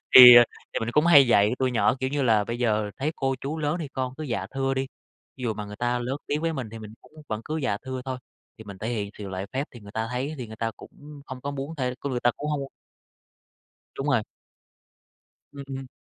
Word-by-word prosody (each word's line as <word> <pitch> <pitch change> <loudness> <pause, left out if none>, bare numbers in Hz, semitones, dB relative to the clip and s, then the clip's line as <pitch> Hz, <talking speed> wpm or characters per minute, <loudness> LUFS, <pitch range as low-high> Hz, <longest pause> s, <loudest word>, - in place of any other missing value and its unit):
Thì 125 -1 +13 0.4
thì - - -2
mình 115 - -2
cũng 150 +3 +3
hay 145 -5 +8
dạy 105 -3 +4
tụi 130 -1 +1
nhỏ, 120 - +3
kiểu 130 - 0
như 145 0 0
là, 110 -5 +3
"Bây 115 +3 -4
giờ 110 -3 +1
thấy 150 +4 -1
cô 135 0 0
chú 150 +4 -4
lớn 150 +1 0
thì 150 - -4
con 130 -2 -3
cứ 155 - -6
'dạ 115 -8 -2
thưa' 135 0 0
đi, 135 0 -1 0.5
ví 130 - -10
dụ 110 -3 0
mà 105 - -5
người 105 0 -9
ta 120 +2 0
lớn 125 +3 -2
tiếng 145 +1 -1
với 165 0 0
mình 130 -7 -4
thì 115 - -8
mình 110 -1 -10
cũng - - -20 0.2
vẫn 110 0 -2
cứ 155 - -3
'dạ 130 -9 0
thưa' 130 0 -5
thôi, 130 -1 -4 0.4
thì 110 - -10
mình 100 -2 -10
thể 110 - -4
hiện 105 -4 -2
sự 100 - -6
lễ 95 +1 -4
phép 135 +2 -1
thì 120 - -12
người 100 0 -12
ta 110 0 -2
thấy 125 +3 -2
á 155 - -5
thì 125 - -5
người 110 0 -10
ta 115 0 -1
cũng 145 0 -13
hông 130 -1 -7
có 140 +3 -4
muốn 140 +3 -5
thêm 125 -3 -1
cái 140 - -2
người 125 -2 -1
ta 120 - +4
cũng 150 +1 -3
hông" 150 -1 -1 1.4
Đúng 135 - -3
rồi. 130 -6 +3 1.3
Ừm, 140 -1 -8
ừm. 135 -1 -6
130 Hz, 260 wpm, -26 LUFS, 110-140 Hz, 1.4 s, Thì